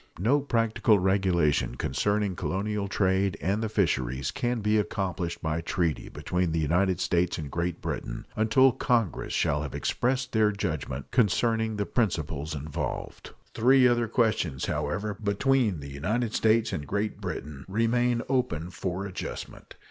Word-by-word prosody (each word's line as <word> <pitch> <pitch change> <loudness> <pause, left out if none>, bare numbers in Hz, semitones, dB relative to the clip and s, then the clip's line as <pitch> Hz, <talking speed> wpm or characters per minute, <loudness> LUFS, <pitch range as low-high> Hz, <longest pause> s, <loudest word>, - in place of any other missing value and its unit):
No 120 - +3
practical 115 -5 +2
regulation 90 -8 +2
concerning 100 +10 0
colonial 100 +3 -2
trade 95 0 +1
and 100 +5 0
the 110 - -1
fisheries 65 - 0
can 120 0 -1
be 105 +1 +2
accomplished 90 -3 -3
by 80 +1 -1
treaty 85 -2 -1
between 90 -2 -1
the 80 - 0
United 90 +4 +2
States 90 -1 +1
and 75 -3 -6
Great 85 0 -2
Britain - - -4
until 130 +5 +5
Congress 115 -6 0
shall 70 +1 +1
have 75 -3 -5
expressed 130 +1 0
their 110 -2 +3
judgment 80 -9 -4
concerning 110 +1 +2
the 100 -1 -1
principles 80 - -1
involved. 75 +1 -5 0.2
Three 130 +2 +5
other 120 -1 +2
questions, 105 - 0
however, 75 +9 -2
between 105 - +1
the 70 0 -8
United 110 - -1
States 110 +1 +2
and 70 -2 -4
Great 105 +1 -2
Britain 75 -2 -5
remain 115 +4 +1
open 125 - -1
for 95 +1 -3
adjustment. 100 - -7
100 Hz, 140 wpm, -27 LUFS, 80-110 Hz, 0.2 s, until